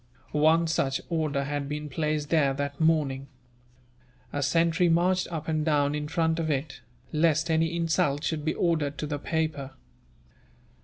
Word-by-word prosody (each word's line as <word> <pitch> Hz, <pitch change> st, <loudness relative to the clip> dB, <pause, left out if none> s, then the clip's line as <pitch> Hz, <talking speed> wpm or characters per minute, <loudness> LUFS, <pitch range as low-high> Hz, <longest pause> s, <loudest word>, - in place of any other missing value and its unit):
One 160 Hz, +3 st, +4 dB
such 135 Hz, -4 st, 0 dB
order 155 Hz, -4 st, 0 dB
had 145 Hz, 0 st, -3 dB
been 150 Hz, 0 st, -4 dB
placed 150 Hz, +1 st, -2 dB
there 140 Hz, -5 st, +3 dB
that 140 Hz, 0 st, -4 dB
morning. 145 Hz, -4 st, +1 dB, 1.1 s
A 145 Hz, -, -1 dB
sentry 165 Hz, +5 st, +2 dB
marched 180 Hz, +2 st, +2 dB
up 160 Hz, -2 st, -4 dB
and 155 Hz, -1 st, 0 dB
down 145 Hz, -2 st, +2 dB
in 150 Hz, 0 st, -3 dB
front 165 Hz, 0 st, 0 dB
of 160 Hz, -1 st, -1 dB
it, 140 Hz, 0 st, -2 dB, 0.3 s
lest 160 Hz, +1 st, +2 dB
any 160 Hz, +1 st, +1 dB
insult 165 Hz, -3 st, +1 dB
should 155 Hz, -2 st, -2 dB
be 155 Hz, -, -1 dB
offered 155 Hz, -5 st, 0 dB
to -, -, -3 dB
the 145 Hz, -1 st, -3 dB
paper. 155 Hz, -4 st, -2 dB
155 Hz, 155 wpm, -27 LUFS, 145-165 Hz, 1.1 s, One